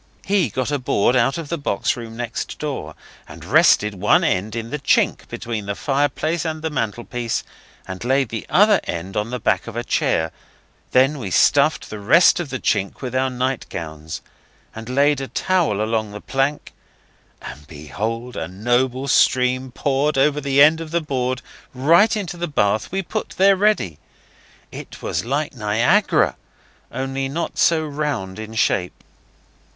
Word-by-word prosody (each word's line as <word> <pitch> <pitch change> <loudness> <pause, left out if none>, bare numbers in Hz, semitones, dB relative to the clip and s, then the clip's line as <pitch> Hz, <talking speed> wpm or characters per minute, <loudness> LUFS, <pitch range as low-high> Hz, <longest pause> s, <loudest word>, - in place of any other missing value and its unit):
He 195 - +2
got 130 +6 -2
a 145 - 0
board 125 -1 +1
out 135 +3 +2
of 165 -4 -6
the 170 - -2
box 120 -3 0
room 115 -2 -8
next 120 -1 -4
door, 135 - -5 0.3
and - - -11
rested 105 0 +4
one 100 +2 +3
end 100 +4 0
in 115 0 -5
the 150 - -3
chink 140 - +1
between 110 -3 -5
the 100 - -2
fireplace 145 +5 0
and 160 -1 -4
the 160 - -2
mantelpiece, 120 -1 -3 0.4
and 95 +2 -6
laid 135 0 +1
the 115 -1 -5
other 210 +1 +5
end 90 +3 -5
on 105 +2 -1
the 125 +1 -4
back - - 0
of 115 - -7
a 120 - -2
chair, 80 -8 0 0.6
then 135 +3 +3
we 105 -6 -5
stuffed - - +3
the 105 - -6
rest 165 - +5
of 170 -5 -4
the 130 - -3
chink 100 0 -1
with 125 -1 -4
our 130 0 +1
nightgowns, 90 - -4 0.5
and 110 +2 -8
laid 140 +2 +2
a 135 - -4
towel 175 - 0
along 110 0 -1
the 105 - -6
plank, 135 +5 -2 0.7
and 75 +2 -10
behold, 110 - -5
a 80 - -3
noble 120 +7 0
stream 130 0 +2
poured 140 +3 0
over 150 +2 +2
the 140 0 +4
end 160 +2 +4
of 165 - -7
the 170 +2 0
board 130 -4 -2 0.3
right 170 - +4
into 180 -4 -5
the 175 0 -2
bath 110 -8 0
we 195 +1 -1
put 215 +4 -5
there 195 +1 +5
ready. 190 - +1 0.7
It - - -10
was 90 +5 -2
like 145 +5 -1
Niagara, 120 - +2 0.5
only 135 +1 -3
not 165 +5 -4
so 160 -2 +3
round 140 -10 -3
in 110 0 -8
shape. 90 -4 +1
130 Hz, 165 wpm, -21 LUFS, 110-150 Hz, 0.7 s, other